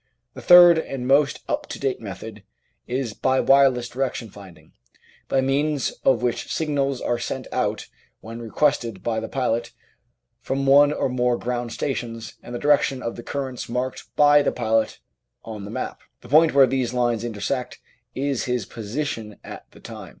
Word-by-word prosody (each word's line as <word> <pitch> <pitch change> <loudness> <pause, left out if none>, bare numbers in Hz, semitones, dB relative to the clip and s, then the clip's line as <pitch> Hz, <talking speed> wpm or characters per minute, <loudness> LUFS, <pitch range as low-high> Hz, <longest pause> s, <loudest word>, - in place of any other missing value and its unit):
The - - -10
third 175 -2 +8
and 135 -5 -5
most 140 +1 +3
up - - -2
to - - -7
date - - -2
method - - -8 0.5
is 125 -3 -2
by 130 +3 +1
wireless 135 -3 +4
direction 125 -4 -3
finding, 90 -6 -14 0.6
by 135 - +2
means 140 +1 0
of 130 - +3
which 120 -1 -2
signals 140 -4 -1
are 120 - -1
sent - - -4
out - - -2 0.3
when 115 +1 -9
requested 115 -4 0
by 110 -2 -1
the 110 - -5
pilot 120 -3 -1 0.7
from 135 +2 -2
one 145 +2 +6
or 150 - -1
more 125 -1 0
ground 120 -1 -3
stations 115 -3 -4
and 120 - -8
the - - -1
direction 140 -2 +2
of 115 - -4
the - - -8
currents 130 -1 -5
marked 125 +2 -3
by 145 0 +6
the 145 - +1
pilot 110 -2 0 0.5
on 105 -3 -7
the - - -8
map; 110 - -5 0.2
the 120 - -14
point 155 +2 +5
where 135 -1 +8
these 125 -1 -1
lines 120 -2 0
intersect 120 +3 -3 0.4
is 135 -1 -1
his 125 -4 -1
position 115 -1 -5
at - - -10
the - - -18
time. - - -10
125 Hz, 170 wpm, -23 LUFS, 115-140 Hz, 0.7 s, third